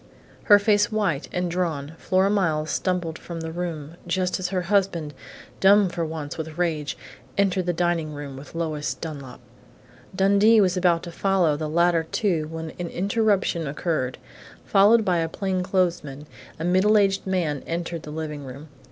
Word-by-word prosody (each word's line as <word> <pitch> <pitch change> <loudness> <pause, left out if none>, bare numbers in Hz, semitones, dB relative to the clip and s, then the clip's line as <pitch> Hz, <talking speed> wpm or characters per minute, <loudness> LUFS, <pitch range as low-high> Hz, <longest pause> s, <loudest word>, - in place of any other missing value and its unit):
Her 205 - +8
face 205 +1 +2
white 195 -9 -1
and 180 -1 -2
drawn, 160 -5 -2
Flora 190 +1 +2
Miles 155 -7 0
stumbled 175 -3 -1
from 170 -1 -7
the 160 0 -5
room, 165 -2 -5
just 185 +1 0
as 185 - -1
her 180 0 -2
husband, 175 -5 0 0.5
dumb 200 0 +5
for 175 -1 -3
once 155 -2 -5
with 160 0 -6
rage, 160 -4 -1 0.4
entered 190 -2 +1
the - - +3
dining 170 -2 0
room 145 -2 -7
with 140 +4 -11
Lois 155 -3 -2
Dunlap. 140 -5 -8 0.8
Dundee 200 +4 +5
was 185 -3 +3
about 175 -2 +2
to 170 - -7
follow 180 -4 +2
the 155 +1 -4
latter 170 0 +2
two 170 -8 0
when 160 0 -6
an 175 - -3
interruption 195 -3 0
occurred. 140 -3 -2 0.5
Followed 210 +3 +5
by 180 -2 +2
a 165 0 -1
plainclothesman, 180 -6 -1 0.3
a 160 - -5
middle 190 +5 +4
aged 195 -1 +2
man 170 -7 -1
entered 170 0 -3
the 150 - -10
living 150 -1 -5
room. 140 +4 -10
175 Hz, 160 wpm, -24 LUFS, 155-190 Hz, 0.8 s, Her